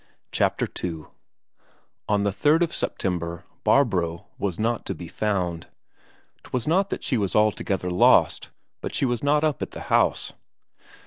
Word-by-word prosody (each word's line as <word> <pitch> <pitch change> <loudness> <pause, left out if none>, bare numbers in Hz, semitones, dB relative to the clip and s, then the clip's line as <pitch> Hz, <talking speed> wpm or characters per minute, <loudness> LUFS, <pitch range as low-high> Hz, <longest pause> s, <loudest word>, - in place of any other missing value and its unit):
Chapter - - +1 0.2
II 80 -3 -4 1.0
On 105 -1 +2
the 100 - +1
3rd 150 - +3
of 170 - -2
September 85 -2 -3 0.2
Barbro 95 -8 +2
was 95 -4 -2
not 115 +2 0
to 95 - -2
be 85 +1 -8
found. 90 -3 -2 0.8
'Twas 125 -2 -3
not 190 +5 +2
that - - -4
she 125 -6 +1
was 100 -3 -1
altogether 100 -3 +1
lost, 90 - +4 0.3
but - - -4
she - - +2
was 120 -2 -1
not 150 +1 +2
up 155 -4 0
at - - -2
the - - -6
house. - - +3
105 Hz, 150 wpm, -25 LUFS, 90-130 Hz, 1.0 s, lost